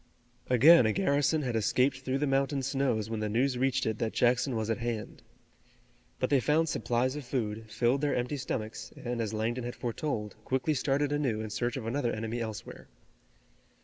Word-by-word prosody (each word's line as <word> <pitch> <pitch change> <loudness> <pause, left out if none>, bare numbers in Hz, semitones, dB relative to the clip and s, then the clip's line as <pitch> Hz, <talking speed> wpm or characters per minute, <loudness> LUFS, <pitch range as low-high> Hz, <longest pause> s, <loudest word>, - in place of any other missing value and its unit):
Again 130 +2 +7
a 110 - +1
garrison 150 -3 +2
had 125 -3 -2
escaped 125 +5 +2
through 130 0 -2
the 145 - 0
mountain 135 0 +1
snows 130 -5 0
when 110 -1 -3
the 105 0 -1
news 125 +5 +1
reached 135 0 +1
it 110 -1 -1
that 110 - -1
Jackson 125 +1 +2
was 110 -1 -1
at 115 - -1
hand. 115 -2 -4 1.0
But - - -1
they 140 - +5
found 155 +5 +2
supplies 125 0 0
of 150 - -5
food, 110 -4 -3
filled 120 +5 +1
their 145 -1 +1
empty 125 +4 -1
stomachs, 110 -4 -4
and 120 -1 -3
as 110 -2 -2
Langdon 115 +3 -2
had 120 0 -5
foretold, 115 -4 -3
quickly 130 +5 0
started 140 +1 0
anew 135 -7 0
in 110 -1 -5
search 120 +5 -1
of 120 - -5
another 120 +1 0
enemy 115 +2 -3
elsewhere. 110 -2 -7
125 Hz, 185 wpm, -30 LUFS, 110-135 Hz, 1.0 s, Again